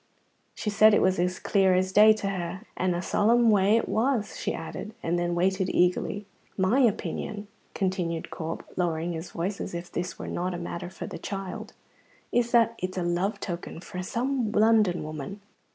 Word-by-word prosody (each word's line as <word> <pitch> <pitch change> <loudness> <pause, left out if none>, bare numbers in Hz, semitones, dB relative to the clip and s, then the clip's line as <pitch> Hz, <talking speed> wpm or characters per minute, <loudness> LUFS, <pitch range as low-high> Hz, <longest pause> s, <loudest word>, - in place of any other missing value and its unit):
She 210 - -2
said 215 +1 +6
it - - +3
was 185 -1 +2
as 180 +1 0
clear 190 -2 +3
as 185 +1 +1
day 215 +2 +8
to 215 -2 0
her. 180 -1 -4
"And 180 -1 0
a 175 - -3
solemn 230 +5 +4
way 205 +2 +4
it 230 - -1
was," 230 -2 0
she - - -1
added, 215 +2 -6
and 175 +1 0
then 175 0 0
waited 190 +2 +1
eagerly. 180 +3 +1 0.3
"My 190 +7 +3
opinion," 210 -3 0 0.3
continued 180 -4 -2
Corp, 160 0 -5
lowering 170 -1 -1
his 165 +2 -6
voice 185 +4 -3
as - - -5
if 170 +1 -6
this 180 +1 -3
were - - -6
not 180 0 -2
matter 175 0 -5
for - - -7
the - - -7
child, 195 -2 -6 0.6
"is 240 -1 +2
that 230 -1 +4
it's 185 +1 -4
a 180 - 0
love 175 +4 0
token 170 -3 -5
frae 180 +1 -6
some 240 +3 -1
London 215 -5 +3
woman." 155 +6 -6
190 Hz, 185 wpm, -27 LUFS, 175-210 Hz, 0.6 s, day